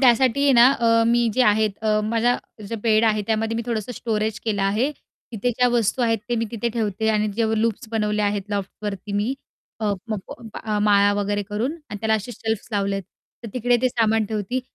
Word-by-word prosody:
त्यासाठी 260 Hz, +1 st, +4 dB
आहे 280 Hz, -, +5 dB
ना 235 Hz, -1 st, +7 dB
अ, 230 Hz, -3 st, +3 dB
मी 235 Hz, 0 st, +3 dB
जे 255 Hz, -, +3 dB
आहेत, 215 Hz, -1 st, +3 dB, 0.3 s
माझा 230 Hz, +3 st, +2 dB, 0.3 s
जो 230 Hz, -, -3 dB
बेड 220 Hz, -1 st, +3 dB
आहे, 215 Hz, -1 st, +2 dB
त्यामध्ये 225 Hz, 0 st, 0 dB
मी 230 Hz, -, -2 dB
थोडंसं 230 Hz, 0 st, -2 dB
स्टोरेज 220 Hz, -2 st, -2 dB
केलं 205 Hz, -3 st, 0 dB
आहे. 215 Hz, +9 st, +1 dB, 0.4 s
तिथे 230 Hz, +2 st, 0 dB
ज्या 245 Hz, +1 st, +2 dB
वस्तू 240 Hz, +1 st, +1 dB
आहेत 225 Hz, -2 st, +2 dB
ते 240 Hz, -, +1 dB
मी 230 Hz, -, 0 dB
तिथे 235 Hz, 0 st, -2 dB
ठेवते, 220 Hz, -1 st, -1 dB
आणि 215 Hz, -1 st, +2 dB
जे 230 Hz, -, +2 dB, 0.2 s
लूप्स 230 Hz, +2 st, -1 dB
बनवले 210 Hz, -1 st, 0 dB
आहेत 205 Hz, -1 st, 0 dB
लॉफ्टवरती 200 Hz, 0 st, -4 dB
मी 210 Hz, +6 st, 0 dB, 0.5 s
अ-अ 210 Hz, -1 st, +1 dB, 0.2 s
म 215 Hz, -, 0 dB, 0.7 s
माळा 205 Hz, -1 st, +4 dB
वगैरे 205 Hz, 0 st, -1 dB
करून 225 Hz, +7 st, -1 dB, 0.2 s
आणि 205 Hz, -, -4 dB
त्याला 220 Hz, 0 st, +2 dB
असे 220 Hz, +3 st, -3 dB
शेल्फ्स 220 Hz, -2 st, -3 dB
लावले 200 Hz, -1 st, 0 dB
आहेत. 195 Hz, -, -4 dB, 0.4 s
तर -, -, -4 dB
तिकडे 245 Hz, 0 st, +2 dB
ते 255 Hz, -, +4 dB
सामान 225 Hz, -2 st, +2 dB
ठेवते, 215 Hz, +4 st, -2 dB
220 Hz, 195 wpm, -23 LUFS, 210-235 Hz, 0.7 s, ना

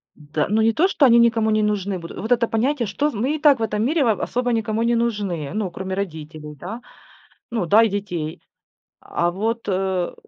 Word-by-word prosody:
Д 150 Hz, 0 st, -3 dB
Ну 215 Hz, +2 st, +2 dB
не 225 Hz, +1 st, +3 dB
то, 335 Hz, +11 st, +3 dB
что 310 Hz, -7 st, +3 dB
они 235 Hz, -2 st, +6 dB
никому 225 Hz, -2 st, +3 dB
не 215 Hz, 0 st, +2 dB
нужны 200 Hz, -3 st, -1 dB
будут, 165 Hz, 0 st, -9 dB
вот 220 Hz, +4 st, -5 dB
это 235 Hz, -1 st, +3 dB
понятие, 240 Hz, +2 st, 0 dB
что 285 Hz, +10 st, 0 dB
з 295 Hz, -, -8 dB
мы 255 Hz, +8 st, 0 dB
и -, -, -5 dB
так 290 Hz, -4 st, +5 dB
в -, -, -1 dB
этом 215 Hz, 0 st, -1 dB
мире 305 Hz, +3 st, +2 dB
в 225 Hz, -5 st, +1 dB
особо 245 Hz, 0 st, -1 dB
никому 225 Hz, -1 st, 0 dB
не 235 Hz, 0 st, +2 dB
нужны, 205 Hz, -10 st, -2 dB
ну 210 Hz, -3 st, -2 dB
кроме 190 Hz, +1 st, -5 dB
родителей, 155 Hz, -5 st, -6 dB
да, 205 Hz, -, -7 dB, 0.7 s
ну 225 Hz, -6 st, -1 dB
да, 210 Hz, +6 st, +5 dB
и 225 Hz, -, +2 dB
детей. 180 Hz, -6 st, -4 dB, 0.6 s
А 170 Hz, -, -1 dB
вот, 225 Hz, +6 st, -3 dB
э, 190 Hz, -2 st, -1 dB
215 Hz, 215 wpm, -22 LUFS, 185-235 Hz, 0.7 s, они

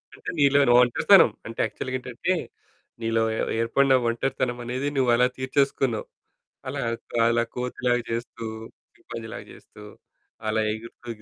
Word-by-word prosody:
అంటే -, -, -6 dB
నీలో‌ని 140 Hz, -2 st, +5 dB
ఒంటరితనం. 120 Hz, -1 st, +5 dB, 0.2 s
అంటే 115 Hz, -, -9 dB
యాక్చువల్‌గా 120 Hz, +4 st, -5 dB
ఏంటంటే, 125 Hz, +8 st, -2 dB, 0.7 s
నీలో 115 Hz, 0 st, +1 dB
ఏ -, -, -2 dB, 0.2 s
ఏర్పడిన 135 Hz, +4 st, +3 dB
ఒంటరితనమనేది 125 Hz, +1 st, -2 dB
నువ్వలా 125 Hz, -1 st, +4 dB
తీర్చేసుకున్నావు. 130 Hz, -3 st, 0 dB, 0.6 s
అలా -, -, -3 dB, 0.5 s
అలా 115 Hz, 0 st, +3 dB
కోతి‌లాగా‌జేస్తూ, 120 Hz, -2 st, -2 dB, 0.5 s
చింపాంజీలాగా‌జేస్తూ, 105 Hz, -, -10 dB, 0.6 s
అలా 110 Hz, 0 st, +1 dB
ఎగురుతూ 115 Hz, +2 st, -9 dB
120 Hz, 95 wpm, -25 LUFS, 115-130 Hz, 0.7 s, నీలో‌ని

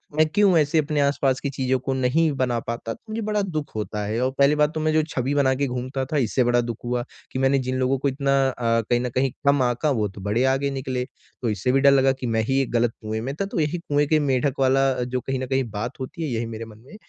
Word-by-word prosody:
मैं 155 Hz, +1 st, +5 dB
क्यों 190 Hz, +2 st, +3 dB
ऐसे 155 Hz, +1 st, +2 dB
अपने 150 Hz, -1 st, 0 dB
आस-पास 140 Hz, -2 st, +1 dB
की 140 Hz, -, -3 dB
चीज़ों 130 Hz, -1 st, 0 dB
को 135 Hz, +2 st, -2 dB
नहीं 130 Hz, +5 st, +2 dB
बना 125 Hz, -2 st, 0 dB
पाता, 115 Hz, 0 st, -5 dB
तो -, -, -16 dB
मुझे 225 Hz, +1 st, -3 dB
बड़ा 210 Hz, 0 st, 0 dB
दुःख 155 Hz, -7 st, -4 dB
होता 105 Hz, -1 st, -3 dB
है 110 Hz, +3 st, -2 dB
और 130 Hz, -, +1 dB
पहली 140 Hz, +1 st, +4 dB
बात 150 Hz, +1 st, +2 dB
तो 155 Hz, -, -3 dB
मैं 155 Hz, 0 st, +1 dB
जो 155 Hz, -, +4 dB
छबि 130 Hz, +2 st, -1 dB
बना 135 Hz, -2 st, +3 dB
के 140 Hz, -, +2 dB
घूमता 130 Hz, +2 st, -3 dB
था, 150 Hz, +3 st, -2 dB
इससे 125 Hz, -1 st, +2 dB
बड़ा 120 Hz, 0 st, +3 dB
दुःख 115 Hz, -2 st, -4 dB
हुआ 120 Hz, 0 st, -1 dB, 0.3 s
कि 130 Hz, -, -3 dB
मैंने 135 Hz, +1 st, +3 dB
जिन 130 Hz, 0 st, -2 dB
लोगों 130 Hz, +1 st, +1 dB
को 140 Hz, -, +1 dB
इतना 140 Hz, 0 st, 0 dB
अ, 115 Hz, -2 st, 0 dB
कहीं 120 Hz, 0 st, +3 dB
न 125 Hz, 0 st, -2 dB
कहीं 130 Hz, 0 st, +2 dB, 0.2 s
कम 140 Hz, -1 st, +4 dB
आका, 120 Hz, +4 st, 0 dB
वो 110 Hz, -7 st, +1 dB
तो 95 Hz, 0 st, -11 dB
बड़े 105 Hz, +5 st, 0 dB
आगे 140 Hz, +1 st, 0 dB
निकले। 130 Hz, -2 st, -3 dB, 0.4 s
तो 120 Hz, -, 0 dB
इससे 115 Hz, +4 st, 0 dB
भी 135 Hz, -, +3 dB
डर 140 Hz, 0 st, +7 dB
लगा 135 Hz, -1 st, +4 dB
कि 125 Hz, -, -2 dB
मैं -, -, +3 dB
ही 135 Hz, 0 st, +2 dB
एक 130 Hz, -, -3 dB
गलत 120 Hz, -1 st, +1 dB
कुएँ 110 Hz, 0 st, -3 dB
में 135 Hz, +4 st, -3 dB
था, 195 Hz, -, -2 dB
तो 195 Hz, -, -3 dB
यही 155 Hz, +3 st, 0 dB
कुएँ 145 Hz, -3 st, 0 dB
के 155 Hz, +1 st, +3 dB
मेंडक 135 Hz, +1 st, 0 dB
वाला 135 Hz, +1 st, +3 dB
जो 125 Hz, +1 st, -2 dB
कहीं 135 Hz, +1 st, -3 dB
न 130 Hz, -, -4 dB
कहीं 135 Hz, 0 st, +1 dB
बात 110 Hz, +5 st, -5 dB
होती 145 Hz, +5 st, -5 dB
है, 155 Hz, -, -2 dB
यही 115 Hz, -1 st, -2 dB
मेरे 115 Hz, 0 st, -6 dB
मन 110 Hz, -1 st, -14 dB
में 210 Hz, -, -13 dB
130 Hz, 275 wpm, -23 LUFS, 120-145 Hz, 0.4 s, डर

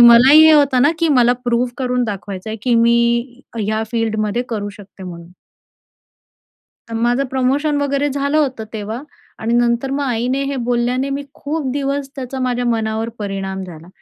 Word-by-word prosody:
मलाही 245 Hz, +6 st, +8 dB
हे 315 Hz, -, +7 dB
होतं 280 Hz, -4 st, +4 dB
ना, 290 Hz, -, +5 dB
की 330 Hz, -1 st, +2 dB
मला 245 Hz, -4 st, +4 dB
प्रूव्ह 240 Hz, 0 st, +1 dB
करून 250 Hz, -1 st, 0 dB
दाखवायचं 200 Hz, -1 st, -5 dB
आहे, 220 Hz, -, -4 dB
की 245 Hz, -2 st, +2 dB
मी 235 Hz, +2 st, +2 dB, 0.2 s
या 220 Hz, +1 st, 0 dB
फील्डमध्ये 220 Hz, 0 st, 0 dB
करू 205 Hz, -3 st, -3 dB
शकते 195 Hz, -1 st, -14 dB
म्हणून. 170 Hz, -1 st, -10 dB, 1.6 s
तर 230 Hz, -, -6 dB
माझं 240 Hz, +4 st, +1 dB
प्रमोशन 265 Hz, +4 st, 0 dB
वगैरे 280 Hz, 0 st, 0 dB
झालं 280 Hz, +2 st, -1 dB
होतं 260 Hz, -7 st, -1 dB
तेव्हा 220 Hz, +4 st, -5 dB, 0.4 s
आणि 230 Hz, +2 st, 0 dB
नंतर 240 Hz, +2 st, +1 dB
मग 285 Hz, +1 st, -1 dB
आईने 250 Hz, +2 st, -1 dB
हे 275 Hz, -, -3 dB
बोलल्याने 245 Hz, +3 st, 0 dB
मी 280 Hz, +1 st, -2 dB
खूप 290 Hz, -2 st, -3 dB
दिवस 280 Hz, 0 st, -2 dB
त्याचा 265 Hz, 0 st, -5 dB
माझ्या 245 Hz, -1 st, -1 dB
मनावर 225 Hz, -1 st, -1 dB
परिणाम 195 Hz, -2 st, -4 dB
झाला. 170 Hz, -2 st, -11 dB
240 Hz, 165 wpm, -18 LUFS, 220-275 Hz, 1.6 s, मलाही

